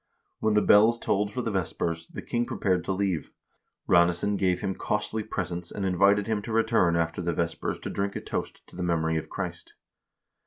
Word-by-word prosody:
When 110 -1 +1
the 105 - +4
bells 110 +3 +6
tolled 105 -2 0
for 125 +1 -3
the 115 - -1
vespers, 85 -3 -2
the - - -8
king 120 0 -1
prepared 90 -3 0
to - - -1
leave. 95 -4 -1 0.6
Ranesson 85 +4 +3
gave 90 -2 +1
him 95 - -1
costly 105 +2 -1
presents 90 -4 -4
and 100 - -4
invited 100 +2 +3
him 110 -1 -1
to 115 - -7
return 110 -6 +3
after 85 +1 -1
the 85 -1 -1
vespers 85 -1 -2
to - - -6
drink 100 0 -2
a - - -3
toast - - -5
to - - -13
the 90 - -5
memory 80 -2 +1
of 80 - -5
Christ. - - -6
95 Hz, 195 wpm, -27 LUFS, 85-105 Hz, 0.6 s, bells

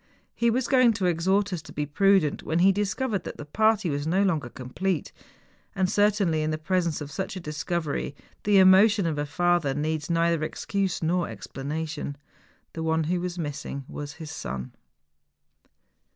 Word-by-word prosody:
He 235 - +2
was 245 +2 0
going 255 -4 +5
to 200 -3 -2
exhort 190 +4 +1
us 175 - -3
to 145 - -13
be 150 - -2
prudent, 190 0 +3
when 160 - -1
he 185 +3 +6
discovered 205 +1 -1
that - - -7
the 150 - -7
party 215 +4 +2
was 145 -1 -2
no 190 +5 +2
longer 160 -10 0
complete. 150 +9 -3 0.6
And 190 -1 +2
certainly, 200 -5 +2
in 155 0 -1
presence 170 -1 -1
of 145 0 -6
such 190 +3 -4
a - - -4
discovery, 150 -1 -3 0.3
the 205 -1 +4
emotion 195 +2 +6
of 155 -3 -1
a 145 - -2
father 175 -3 +1
needs 155 +1 -2
neither 170 -1 +2
excuse 195 +2 -2
nor 175 +2 +1
explanation. 150 +1 -5 0.6
The 165 - -5
one 160 0 +1
who 175 +3 -1
was 180 0 -4
missing 145 -3 -5
was 145 0 -6
his 160 -1 -8
son 65 +1 -5
170 Hz, 165 wpm, -26 LUFS, 150-195 Hz, 0.6 s, he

